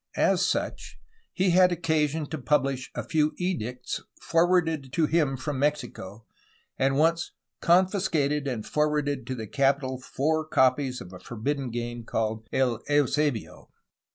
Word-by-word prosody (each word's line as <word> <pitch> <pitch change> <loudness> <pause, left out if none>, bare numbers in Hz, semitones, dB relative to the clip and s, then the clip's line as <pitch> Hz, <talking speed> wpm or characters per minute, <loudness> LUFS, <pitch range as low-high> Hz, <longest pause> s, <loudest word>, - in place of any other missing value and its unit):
As - - +3
such - - -2 0.3
he 185 0 +1
had 180 +1 +5
occasion 160 -2 0
to 160 - -3
publish 135 0 0
a - - -3
few 155 -1 +1
edicts 125 -10 -3 0.2
forwarded 165 -5 +1
to 165 - +3
him 150 -4 +1
from 135 +1 -3
Mexico, 120 -8 -2 0.5
and 135 0 +1
once 165 +3 +2 0.3
^'confiscated 170 -6 +2
and 120 -5 -3
forwarded 150 -2 0
to 130 - -3
the 110 -3 -5
capital 135 +2 +1
four 155 +5 -1
copies 130 -2 +2
of 90 - -10
a 90 - -9
forbidden 135 +3 -3
game 120 0 -4
called 110 -1 -2
El 125 -4 +1
Eus6bio." 145 -3 0
140 Hz, 135 wpm, -27 LUFS, 125-155 Hz, 0.5 s, had